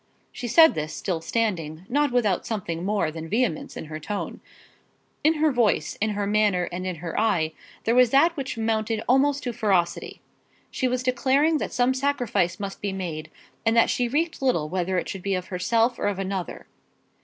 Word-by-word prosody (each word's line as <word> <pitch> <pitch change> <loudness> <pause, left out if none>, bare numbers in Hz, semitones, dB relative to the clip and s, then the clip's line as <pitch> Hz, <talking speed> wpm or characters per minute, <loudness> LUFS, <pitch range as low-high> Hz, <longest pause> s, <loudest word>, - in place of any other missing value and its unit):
She 245 - -6
said 320 +7 +7
this, 155 0 -4
still 175 -5 -2
standing, 170 -5 -2
not 290 +3 +1
without 215 -7 +1
something 175 -6 -4
more 195 -5 0
than 160 0 -7
vehemence 220 -7 -1
in - - -6
her 155 0 -7
tone. 200 +6 -5 0.8
In 315 +2 +4
her 310 0 +2
voice, 240 -5 +1
in 220 - +2
her 205 - 0
manner, 205 -4 +2
and 185 +1 -4
in 185 - -2
her 165 - -2
eye 175 -8 +1 0.3
there 230 - +2
was 250 -1 +5
that 325 +7 +4
which 275 -5 -4
amounted 220 0 -1
almost 280 +3 +3
to 245 - -3
ferocity. 195 -7 0 0.5
She 260 - 0
was 250 0 -1
declaring 275 +5 +2
that - - -3
some 250 +1 +2
sacrifice 260 -9 0
must 200 -1 -6
be 200 - -2
made, 165 -5 -5 0.3
and 225 +1 +2
that 230 - +5
she 245 - 0
recked 315 +5 -1
little 170 - +1
whether 185 +1 -1
it 175 - -1
should 195 - -5
be 195 +1 -1
of 185 0 -5
herself 230 +6 +1
or - - 0
of 205 -2 -1
another. 190 -2 -4
215 Hz, 190 wpm, -25 LUFS, 180-250 Hz, 0.8 s, said